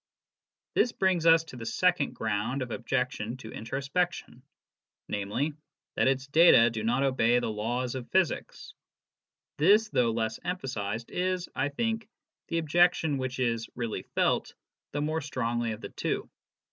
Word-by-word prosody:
This 245 - +3
brings 185 -5 +1
us 165 0 +7
to 160 - -12
the 115 - -7
second 175 +4 +1
ground 110 +5 -1
of 125 - -8
objection 125 -1 -2
to 110 -3 -10
intro 125 +5 -4
spection, 155 -2 -2 0.7
namely, 105 +10 -2 0.4
that - - +2
its 135 0 +1
data 140 -5 +6
do 110 -1 -4
not 120 +4 +1
obey 125 -3 +3
the 120 -2 -1
laws 120 +4 -2
of 130 -2 -6
physics. 185 -3 -1 0.9
This, 210 +7 +5
though 125 - +2
less 110 -1 -2
emphasised, 120 - -4
is, 180 0 -1
I 140 - 0
think, 225 +7 -2 0.4
the 165 - -1
objection 165 -2 +3
which 130 0 -3
is 115 -3 -1
re.ally 115 -3 -3
felt - - +1 0.4
the 145 - -2
more 155 +2 -1
strongly 120 -5 -2
of 110 +1 -6
the - - -6
two. - - -3
130 Hz, 150 wpm, -29 LUFS, 115-165 Hz, 0.9 s, us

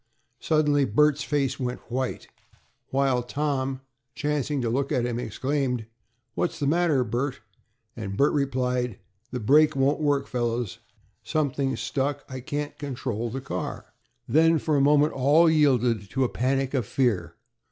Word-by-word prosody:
Suddenly 150 -3 +2
Bert's 150 +6 +3
face 145 -3 -1
went 125 -1 -3
white. 130 +1 -3 1.0
Tom, 135 -2 -1 0.3
chancing 145 0 -1
to 115 - 0
look 135 +3 -1
at 120 -2 +1
him, 120 -1 -2
exclaimed, 125 0 -2 0.5
"What's 175 - -1
the 145 - -2
matter, 155 -3 +2
Bert?" 125 +4 -2 0.5
and 100 0 -5
Bert 140 - +3
replied, 125 -5 0 0.3
"The 125 - -4
brake 150 +7 +4
won't 140 +3 +2
work, 145 -2 +1
fellows. 120 -3 -2 0.4
Something's 135 -5 -1
stuck. 140 +6 -2
I 130 -1 -6
can't 145 +3 -4
control 125 -5 -3
the 135 +4 -5
car." 135 - -5 0.3
Then 165 +2 +4
for 155 0 0
a 140 - +3
moment 145 +2 +4
all 145 +6 +4
yielded 125 -9 +2
to 135 +4 0
a 125 - +1
panic 135 +2 0
of 125 -7 0
fear. 120 -8 0
135 Hz, 140 wpm, -26 LUFS, 125-145 Hz, 1.0 s, brake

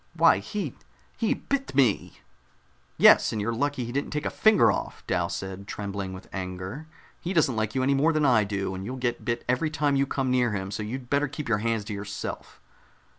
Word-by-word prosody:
"Why, 95 - +5
he 155 - -4 0.4
he 225 - +1
bit 275 - -3
me!" 125 -7 +2 0.8
"Yes, - - +7
and 110 - -2
you're 110 +3 -1
lucky 140 +1 -1
he 120 - -5
didn't 140 +3 -2
take 150 0 -3
a - - -1
finger 220 -1 +5
off," - - -5
Dal - - 0
said, 95 +1 -6
trembling 100 -2 -4
with 95 0 -9
anger. 95 +10 -5 0.3
"He 180 +2 -3
doesn't 150 -8 +3
like 110 -1 -1
you 130 - +1
any 140 +2 +3
more 145 +4 +3
than 155 -2 +1
I 120 -5 +5
do, 100 -2 -2
and 95 0 -5
you'll 125 +6 -5
get 120 -2 -2
bit 120 0 -2
every 125 +6 +1
time 150 -2 +1
you 135 0 +2
come 130 -2 -1
near 125 -3 +2
him, 95 -1 -3
so 105 - -3
you'd 120 +4 -6
better 145 +1 +2
keep 140 +1 -6
your 115 -3 +2
hands 115 -1 -1
to 105 - -5
yourself." 100 0 -6
120 Hz, 215 wpm, -26 LUFS, 100-140 Hz, 0.8 s, Yes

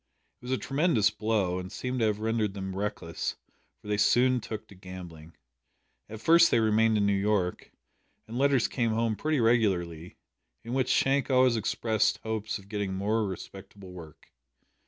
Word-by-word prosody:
It - - -14
was 125 - -5
a 130 - +1
tremendous 135 - +1
blow, 105 -4 -1
and 90 +1 -7
seemed 125 +3 -4
to 115 - +2
have 105 -1 0
rendered 110 -2 -1
them 95 -1 -5
reckless, 95 -4 -3 0.4
for - - -16
they 105 0 0
soon 125 +5 +3
took 110 -1 -6
to - - -13
gambling. 90 -4 -11 0.7
At 110 0 -9
first 170 +5 +6
they 115 - +3
remained 110 0 +3
in 100 - +2
New 100 - +2
York, 100 -2 -1 0.6
and 115 - -8
letters 135 -2 +2
came 115 -3 -1
home 115 0 0
pretty 155 +4 -1
regularly, 95 -8 0 0.5
in 115 - -6
which 130 -1 0
Shank 140 +1 +2
always 130 -2 +4
expressed 110 0 0
hopes 110 -1 -3
of 100 -1 -16
getting 100 -2 -3
more 105 +3 0
respectable 95 0 -9
work. 80 -4 -13
110 Hz, 170 wpm, -28 LUFS, 95-115 Hz, 0.7 s, first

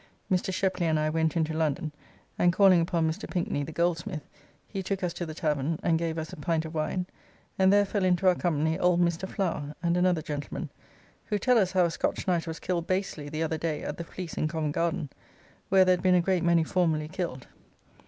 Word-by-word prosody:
Mr. 185 +1 +1
Shepley 185 -2 0
and 155 -1 +2
I 155 0 +1
went 160 0 +1
into 160 -1 0
London, 155 0 -1 0.5
and 175 - +5
calling 185 -1 +5
upon 165 -1 +1
Mr. 160 - -4
Pinkney, 170 -5 -1
the 160 - -6
goldsmith, 170 0 -1 0.4
he 195 - -4
took 195 0 -3
us 175 -2 -1
to 175 -1 -4
the 155 - -7
tavern, 150 -1 -1
and 165 -2 +2
gave 165 -1 -2
us 160 -1 -5
a - - -8
pint 160 +2 -1
of 160 - -7
wine, 165 +3 -1 0.5
and 190 0 +5
there 205 0 +5
fell 200 0 -1
into 185 0 +2
our 185 - +7
company 160 -1 0
old 180 -1 +3
Mr. 175 +2 0
Flower 150 -6 -2
and 170 0 +2
another 180 -3 +2
gentleman; 145 -1 -5 0.5
who 210 - 0
tell 245 +4 +3
us 190 -3 +1
how 185 -2 +4
a 170 - 0
Scotch - - -2
knight 175 -2 +1
was 160 0 -4
killed 175 -2 -2
basely 185 -6 -2
the 155 +2 -2
other 160 0 -2
day 155 -2 -2
at 150 - -4
the 170 - -4
Fleece 170 0 -7
in 155 - +1
Covent 155 -2 -2
Garden, 165 -4 -1 0.6
where 190 0 +6
there 185 - +5
had - - -9
been 185 -1 +5
a - - +5
great 180 0 +1
many 170 -1 +4
formerly 160 -3 +1
killed. 165 -7 -4
170 Hz, 220 wpm, -28 LUFS, 160-185 Hz, 0.6 s, our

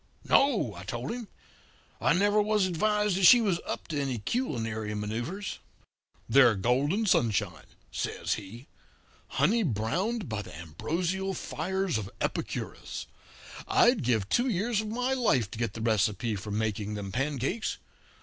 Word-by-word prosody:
No,' 240 - +3
I 85 - -9
told 120 +6 -4
him. 240 -2 -5 0.7
'I - - +4
never 205 +4 +3
was 210 -1 +2
advised 210 +2 +1
that 190 - +3
she 245 - +9
was 195 -7 +1
up - - -4
to 150 -3 -1
any 135 -3 -1
culinary 110 - -2
manoeuvres.' 120 - -4 0.7
"'They're 120 -1 +6
golden 135 - +1
sunshine,' 115 - 0 0.2
says - - -2
he, 110 +5 -8 0.6
'honey 230 +3 +2
browned 175 - -1
by 110 -3 -3
the 85 - -10
ambrosial 170 - -2
fires 185 -4 -2
of 100 -2 -6
Epicurus. - - -4 0.6
I'd 240 -2 +4
give 115 -6 +1
two 240 - +2
years 215 +2 0
of 215 - -6
my 250 +4 -1
life 135 - +2
to 115 - -7
get 115 -1 -1
the 115 - -6
recipe 110 +1 +1
for 105 +2 -6
making 105 0 -2
them 100 -2 -5
pancakes. 140 - -1
140 Hz, 145 wpm, -29 LUFS, -, 0.7 s, she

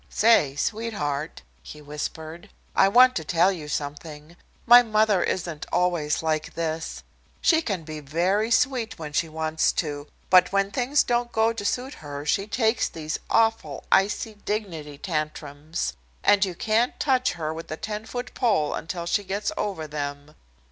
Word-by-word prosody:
"Say, 205 -12 +4
sweetheart," 155 -7 -3 0.2
he 150 - -11
whispered, 155 +3 -7 0.3
"I 195 - +6
want 255 +5 +6
to 160 - -3
tell 175 +4 +3
you 160 -6 -6
something. 150 +2 -6 0.3
My 240 +1 +9
mother 215 -4 +2
isn't 170 -4 -3
always 165 -4 +1
like 155 -1 -1
this. 165 -1 -3 0.4
She 325 -1 +4
can 195 - -3
be 155 -1 -7
very 180 +9 0
sweet 235 -2 +1
when 150 -2 -7
she 160 +2 0
wants 160 0 0
to. 145 -2 -3 0.2
But 185 -1 +6
when 195 0 +1
things 265 +5 +2
don't 240 0 0
go 220 +1 +2
to 225 - -6
suit 255 +6 -2
her 145 -1 -7
she 195 +6 0
takes 225 +1 +1
these 155 0 -5
awful 225 -11 +1
icy 205 +3 +2
'dignity' 165 -9 -4
tantrums, 155 - -4 0.3
and 205 -1 +5
you 185 -2 -5
can't 225 +6 0
touch 255 -3 +2
her 160 -2 -3
with 165 +1 -8
a 155 - -3
ten 215 +2 -5
foot 245 +1 -5
pole 205 - +1
until 170 +1 -4
she 205 +4 0
gets 200 +2 -2
over 190 -6 -3
them. 145 0 -5
175 Hz, 160 wpm, -25 LUFS, 155-220 Hz, 0.4 s, My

